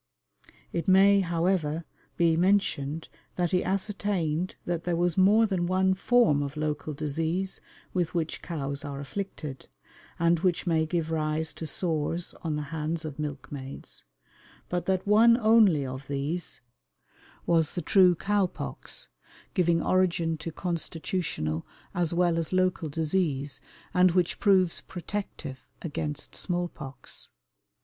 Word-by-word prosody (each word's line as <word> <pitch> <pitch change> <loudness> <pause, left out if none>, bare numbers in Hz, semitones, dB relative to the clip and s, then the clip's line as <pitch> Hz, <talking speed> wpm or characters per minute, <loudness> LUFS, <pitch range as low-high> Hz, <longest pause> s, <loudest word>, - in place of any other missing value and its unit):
It 170 - -2
may, 195 +1 +6
however, 170 -3 0 0.3
be 170 -2 +4
mentioned 165 -5 +1 0.3
that 175 -2 0
he 180 - +2
ascertained 185 -4 -1
that 170 -2 -2
there 175 -1 0
was 175 0 +1
more 205 +4 +5
than 185 -5 0
one 190 +1 +3
form 195 -7 +3
of 140 +1 -4
local 150 0 -2
disease 160 +6 -2 0.3
with 175 -2 -1
which 165 -2 -1
cows 140 -4 -3
are 140 -1 -5
afflicted, 150 -3 -6 0.5
and 170 0 +3
which 180 -1 +1
may 160 -2 +2
give 165 -1 -1
rise 155 0 -1
to 160 - -5
sores 165 0 0
on 160 -3 -2
the 150 - -2
hands 160 +1 -2
of 155 -1 -6
milkmaids, 140 -2 -6 0.6
but 175 0 -2
that 190 -1 +1
one 225 +3 +6
only 215 - +5
of 130 +1 -6
these 145 +4 -3 0.8
was 165 -3 +2
the 175 - -1
true 185 -1 +5
cow 200 +2 +1
pox, - - -5 0.5
giving 170 -3 +2
origin 175 -3 +2
to 165 +1 -5
constitutional 165 - -2 0.3
as 175 -4 0
well 170 -1 +2
as 165 - -3
local 185 -3 +1
disease, 150 -3 -1 0.3
and 180 -1 +5
which 180 -2 +1
proves 190 -4 +3
protective 175 -7 -6 0.2
against 150 -2 -4
small 175 -1 -1
pox. 135 -4 -9
170 Hz, 135 wpm, -28 LUFS, 155-185 Hz, 0.8 s, may